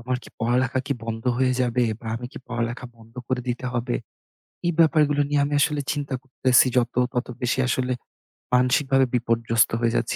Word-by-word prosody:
আমার 125 +2 -2
কী - - -12
পড়ালেখা 125 +3 +1
কী - - +1
বন্ধ 115 0 -5
হয়ে 130 -1 +3
যাবে 125 0 +1 0.2
বা 115 - -11
আমি 125 +1 -6
কী - - -8
পড়ালেখা 120 +1 -3
বন্ধ 115 0 -18
করে 130 -1 0
দিতে 125 +1 -2
হবে? 120 0 -1 0.7
এই 175 - +3
ব্যাপারগুলো 150 -3 +4
নিয়ে 145 -1 +2
আমি 145 - -3
আসলে 150 -1 +1
চিন্তা 145 -2 -4
করতেছি 130 -1 +3
যত 120 -1 +1 0.2
তত 125 0 -1
বেশি 125 +1 0
আসলে 125 +1 0 0.6
মানসিকভাবে 130 +2 +3
বিপর্যস্ত 115 -1 +2
হয়ে 115 -1 +1
যাচ্ছি 115 - 0
125 Hz, 175 wpm, -24 LUFS, 120-135 Hz, 0.7 s, ব্যাপারগুলো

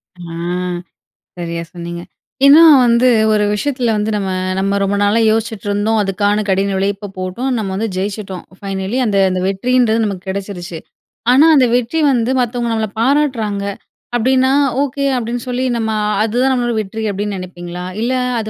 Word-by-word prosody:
அ - - -23 1.2
சரியா 170 -1 -4
சொன்னீங்க. 170 0 -6 0.4
ஏன்னா 290 +4 +8 0.2
வந்து 235 +1 +4 0.3
ஒரு 210 -1 +2
விஷயத்துல 250 0 -1
வந்து 210 +1 -1
நம்ம 195 -2 -2 0.3
நம்ம 195 +1 0
ரொம்ப 195 +1 0
நாளா 205 +3 +2
யோசிச்சிட்டுருந்தோம், 215 -1 -1
அதுக்கான 205 +2 0
கடின 195 +1 +1
உழைப்ப 200 +1 -2
போட்டோம், 185 +8 -3
நம்ம 210 -3 -3
வந்து 220 +4 -1
ஜெயிச்சிட்டோம். 195 -1 -4 0.2
ஃபைனலி 195 +3 -3
அந்த 205 -3 0
அந்த 185 0 -2
வெற்றின்றது 230 +3 +1
நமக்கு 195 -3 -5
கெடச்சிருச்சு. 190 -3 -5 0.5
ஆனா 270 +5 +6
அந்த 265 -3 +5
வெற்றி 250 +6 0
வந்து 240 -1 +1
மத்தவங்க 240 -1 -2
நம்மளப் 220 -1 -3
பாராட்டுறாங்க 235 -7 0 0.5
அப்டின்னா, 260 +2 +2 0.3
"ஓகே" 280 0 -1
அப்டின்னு 240 0 -4
சொல்லி 250 +1 -1
நம்ம 220 -1 -1 0.3
அதுதான் 245 +4 +1
நம்மளோட 240 -2 0
வெற்றி 220 +2 -6
அப்டின்னு 205 +1 -3
நெனப்பீங்களா? 180 -1 -7 0.2
இல்ல 240 +2 0 0.3
அது 220 -1 -4
215 Hz, 145 wpm, -16 LUFS, 195-240 Hz, 1.2 s, ஏன்னா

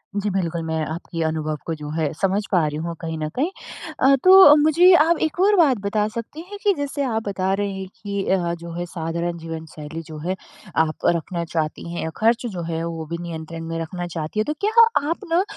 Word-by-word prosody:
जी, 205 0 0
बिल्कुल 170 -3 -1
मैं 160 0 -1
आपकी 165 +1 -5
अनुभव 155 -1 -2
को 165 - -2
जो 150 0 -6
है 155 -3 0
समझ 195 +1 +2
पा 175 -5 +3
रही 150 0 -4
हूँ 170 0 -4
कहीं 160 -1 -4
न 155 - -2
कहीं। 290 +7 +1 0.5
अ, 275 +1 +6
तो 375 +1 +9
अ, 290 - +10
मुझे 335 +5 +6
आप 335 0 +5
एक 320 +2 -1
और 405 +3 +5
बात 300 -9 +4
बता 210 +1 0
सकती 230 +8 -6
हैं 410 - -7
कि 410 - +4
जैसे 285 0 -2
आप 225 -4 -1
बता 190 -1 0
रहे 200 0 -1
हैं 190 0 -6
कि 200 -1 -3
अ, 175 -3 +1
जो 170 0 -8
है 175 - -2
साधारण 170 0 -3
जीवन 165 -1 -6
शैली 155 +2 -7
जो 155 - -8
है 185 - 0 0.4
आप 160 -1 0
रखना 170 +1 0
चाहती 160 0 -3
हैं 170 - -4
या 160 - -2
ख़र्च 230 +2 +2
जो 190 -7 -4
है 165 0 -2
वो 165 -1 -4
भी 170 - -2
नियंत्रण 165 -1 -6
में 165 0 -4
रखना 175 +2 -4
चाहती 165 +3 -4
हैं। 215 - +1
तो 300 - -1
क्या 425 - +2 0.4
आप 335 - -1
ना 345 +3 +4
175 Hz, 230 wpm, -22 LUFS, 165-230 Hz, 0.5 s, अ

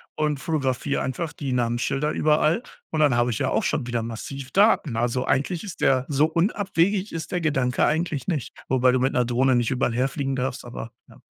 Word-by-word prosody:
und 150 -2 0
fotografiere 140 -3 -1
einfach 150 +5 -3
die 135 -3 -4
Namensschilder 125 +4 0
überall. 155 +6 +2 0.3
Und 160 - -2
dann 145 -5 +4
habe 120 +1 +2
ich 110 - -3
ja - - 0
auch - - +1
schon 120 - -1
wieder 120 -2 -1
massiv 130 +4 -7
Daten. 195 - +3
Also, 120 +2 0
eigentlich 160 +5 0
ist 195 -6 -8
der 130 -1 +3
so 145 +1 +3
unabwegig 190 +3 0
ist 165 -1 -5
der 180 - 0
Gedanke 135 -5 +1
eigentlich 155 -2 -1
nicht, 155 -9 -2
wobei 130 -1 +3
du 125 - +1
mit 130 +1 +1
'ner 125 -1 +2
Drohne 125 +2 +2
nicht 120 +1 +1
überall 125 -2 0
herfliegen 135 +2 -1
darfst. 130 -1 -3
Aber, 120 -1 -7 0.2
ja. - - -18
135 Hz, 200 wpm, -24 LUFS, 125-155 Hz, 0.3 s, dann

